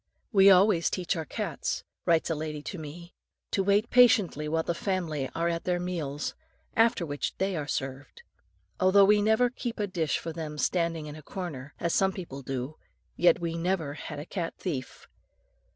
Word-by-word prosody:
"We 195 -3 +7
always 185 -2 +5
teach 185 0 -1
our 160 -2 -3
cats," - - -3 0.2
writes 165 0 +3
a - - +3
lady 150 -1 -4
to 190 - -6
me, 170 +3 -9 0.4
"to 195 - +1
wait 200 +4 +2
patiently 210 - +5
while 160 +1 +1
the 170 - -1
family 170 -7 -2
are 170 +1 0
at 170 -1 -1
their 180 -1 +1
meals, 155 -6 -3 0.4
after 225 -5 +3
which 145 -2 -3
they 190 0 0
are 150 -3 -3
served. 135 - -5 0.6
Although 190 +2 +6
we 210 +1 +5
never 220 +3 +3
keep 240 -2 -5
a 210 - +1
dish 170 -6 -1
for 165 - -5
them 155 -2 -5
standing 165 -1 0
in 150 0 -7
a 155 - -10
corner, 150 -5 -7
as 170 - 0
some 190 0 +3
people 165 -8 -7
do, 135 +3 -4 0.4
yet 175 0 +4
we 170 -1 -2
never 170 -4 -1
had 150 - -7
a 145 - -6
cat 175 -2 -4
thief. 140 -9 -5
170 Hz, 185 wpm, -28 LUFS, 150-190 Hz, 0.6 s, We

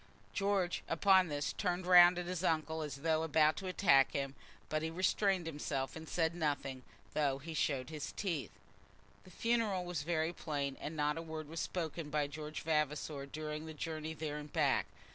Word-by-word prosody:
George 195 -3 +1
upon 190 +2 +5
this 145 -2 -2
turned 180 -2 -1
round 180 0 +8
at 180 - -2
his 180 0 -3
uncle 160 -1 0
as 150 -2 -4
though 160 -1 +2
about 155 -1 +4
to 190 - -5
attack 165 -8 +4
him, 140 -2 -2 0.3
but 155 0 -1
he 160 - -1
restrained 185 +1 +1
himself 145 -4 -3
and 160 0 -8
said 165 -1 +1
nothing, 145 -5 -2 0.3
though 140 -3 +1
he 160 +4 -7
showed 140 -2 0
his 155 -2 -5
teeth. 170 -8 -2 0.8
The - - -13
funeral 215 -2 0
was 175 -4 -3
very 160 +1 0
plain, 140 -5 -3
and 155 - -4
not 150 +1 0
a - - -4
word 160 -2 -6
was 165 +2 -5
spoken 165 -3 -3
by 150 -1 +1
George 150 +1 -6
Vavasor 150 -2 -1
during 155 +1 -5
the 160 - -7
journey 160 0 -4
there 150 -1 -4
and 150 0 -8
back. - - +2
160 Hz, 180 wpm, -35 LUFS, 150-175 Hz, 0.8 s, round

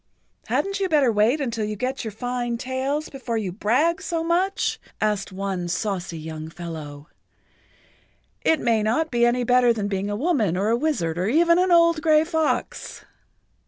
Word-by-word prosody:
"Hadn't 395 0 -1
you 385 -1 0
better 290 -6 +4
wait 220 +7 +2
until 235 -5 -2
you 210 0 -3
get[Pg 230 - -2
72] - - -4
your - - -4
fine 240 +2 -3
tails 265 +5 -2
before 255 -4 -4
you 200 -4 -2
brag 270 - +1
so 335 -3 -2
much?" 365 +4 0 0.2
asked 210 -2 -1
one 190 -2 -3
saucy 180 -1 -3
young 155 0 -7
fellow. 160 -4 -8 1.4
"It 320 - +3
may 230 -2 +2
not 240 +10 0
be 240 -1 +3
any 245 +1 +1
better 245 0 +4
than 215 -3 -1
being 200 0 -2
a 205 - -2
woman 225 - +1
or 200 +3 0
a 230 - +3
wizard 235 - -1
or 185 - 0
even 335 +7 +4
an 365 0 +2
old 335 -2 +5
gray 310 -1 +4
fox." 320 -2 -2
235 Hz, 175 wpm, -23 LUFS, 200-310 Hz, 1.4 s, old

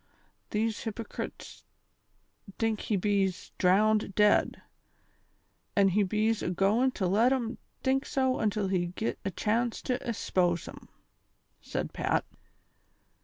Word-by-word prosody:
These 220 +1 -1
hypecrets 225 0 -6 0.9
tink 225 -2 0
he 215 - -1
bees 195 -1 0
drown 210 +4 +4
'd 200 -2 -8
dead, 210 0 +3 1.2
an' 200 -1 +5
he 200 +3 +2
bees 215 +3 +1
agoin' 195 +8 +2
to 190 - -2
let 215 +7 +3
'em 245 -3 -1 0.2
tink 270 +1 +1
so 260 -1 +1
until 210 -2 0
he 180 -2 0
git 185 +6 -3
a 195 - -1
chance 225 +5 0
to 250 -1 -1
e'spose 175 -6 0
'em," - - -11 0.7
said - - -4
Pat. - - 0
210 Hz, 120 wpm, -29 LUFS, 195-230 Hz, 1.2 s, an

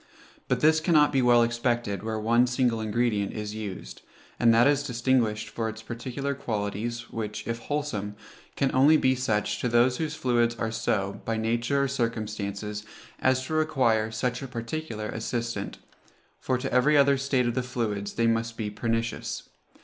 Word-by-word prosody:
But 125 -1 0
this 160 +1 +5
cannot 155 -3 +4
be 135 - +3
well 120 -1 +5
expected 120 -4 -1
where 110 0 -3
one 120 +3 +3
single 125 -2 +1
ingredient 110 -2 0
is 105 -1 -4
used, 100 - -7 0.4
and 120 -1 +5
that 115 +1 +5
is 145 0 +3
distinguished 120 -5 0
for 110 0 -2
its 110 0 -8
particular 130 +5 -4
qualities, 115 -2 -3
which, 105 -1 -4
if 115 0 -2
wholesome, 115 -8 -3 0.4
can 135 -1 0
only 145 +4 +6
be 130 -3 +3
such 105 -4 -1
to 125 - 0
those 120 +2 +3
whose 160 -1 -2
fluids 120 -3 +1
are 110 -1 -2
so, 100 -3 -1
by 115 0 -1
nature 120 +5 +1
or - - +1
circumstances, 105 -4 -3 0.4
as 130 0 +2
to 155 - -5
require 130 -9 +2
such 125 +3 -2
a 135 - -5
particular 115 -2 -5
assistant; 115 -1 -3 0.6
for 130 - 0
to 125 - -4
every 140 +4 +4
other 140 0 +5
state 135 -2 +1
of 120 - 0
the 130 - 0
fluids 110 -5 -3
they 115 - +1
must 115 0 0
be 105 -2 -3
pernicious. 115 +2 -3
120 Hz, 170 wpm, -27 LUFS, 110-130 Hz, 0.6 s, only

